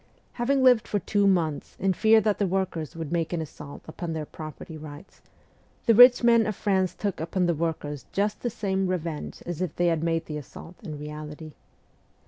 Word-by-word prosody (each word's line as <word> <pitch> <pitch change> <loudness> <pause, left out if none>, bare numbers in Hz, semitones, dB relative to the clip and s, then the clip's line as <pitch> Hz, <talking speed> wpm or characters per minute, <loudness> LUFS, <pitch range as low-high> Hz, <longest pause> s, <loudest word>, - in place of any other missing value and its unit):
Having 260 +2 +1
lived 250 -4 +5
for 205 - 0
two 205 0 +1
months 165 -6 0
in 190 0 +2
fear 220 +4 +5
that 210 -2 0
the 200 - +2
workers 175 -5 -2
would 165 -2 -5
make 165 -2 -1
an 170 - 0
assault 150 -2 -8
upon 165 +1 -5
their 155 -1 -3
property 155 +1 -9
rights, 155 +2 -11 0.6
the 230 - +5
rich 245 +2 +8
men 230 -2 +5
of 215 - -2
France 190 -2 0
took 200 -3 -3
upon 175 +3 0
the 170 - +2
workers 150 -3 -3
just 205 +1 -1
the 240 - -1
same 195 -4 -1
revenge 170 -4 -4
as 175 -1 -4
if 180 -5 -2
they 175 - +1
had 160 - -2
made 165 -1 0
the 150 - -5
assault 160 +4 -11
in 155 -7 -7
reality. 150 +1 -8
175 Hz, 195 wpm, -26 LUFS, 155-205 Hz, 0.6 s, rich